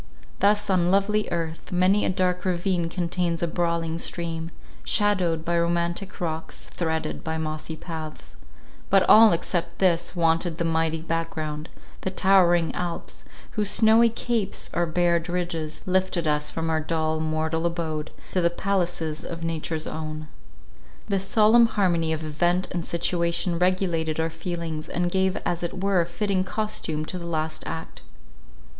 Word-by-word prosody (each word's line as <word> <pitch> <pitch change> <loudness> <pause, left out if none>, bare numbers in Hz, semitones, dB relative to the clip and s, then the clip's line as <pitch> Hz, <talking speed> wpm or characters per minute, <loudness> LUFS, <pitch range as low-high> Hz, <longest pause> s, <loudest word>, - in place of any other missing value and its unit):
Thus 205 +1 +3
on 180 -3 +2
lovely 200 +2 +2
earth, 165 -1 -4
many 185 +3 +3
a - - +1
dark 180 -1 0
ravine 175 -2 0
contains 170 -1 -1
a - - +2
brawling 170 -1 -1
stream, 165 -1 -3 0.3
shadowed 180 -6 +2
by 170 0 +1
romantic 170 +2 -1
rocks, 160 -2 -4
threaded 160 -2 -3
by 160 0 -2
mossy 155 0 -4
paths—but 155 - -4
all, 220 0 +8
except 170 0 -2
this, 175 -1 +1
wanted 165 0 +1
the 170 - -1
mighty 160 0 0
back 165 0 -2
ground, 155 0 -5 0.3
the - - -1
towering 180 -3 +4
Alps, 175 -1 -5 0.3
whose 210 -2 0
snowy 225 +2 +5
capes, 230 -3 -2
or 175 0 +1
bared 170 0 +1
ridges, 170 -3 -3
lifted 185 -2 +1
us 150 -1 +1
from 165 0 -2
our 160 0 +1
dull 160 0 -1
mortal 160 +1 0
abode, 160 -3 -3 0.2
to 185 - +1
the 170 - +4
palaces 175 -4 -1
of 165 -1 -6
Nature's 160 -1 -2
own. 155 -1 -5 0.8
This 195 -1 -1
solemn 225 +3 +6
harmony 175 -7 +1
of 160 0 -2
event 175 +4 +1
and 175 -2 -2
situation 170 0 0
regulated 175 -4 +1
our 160 0 0
feelings, 165 -1 -5
and 175 0 -1
gave 190 0 +1
as 175 - -1
it 180 +2 -4
were 195 -3 +3
fitting 185 +2 0
costume 190 -7 -2
to 180 - -5
our - - -8
last 160 -1 -2
act. 160 - -6
170 Hz, 150 wpm, -25 LUFS, 160-185 Hz, 0.8 s, all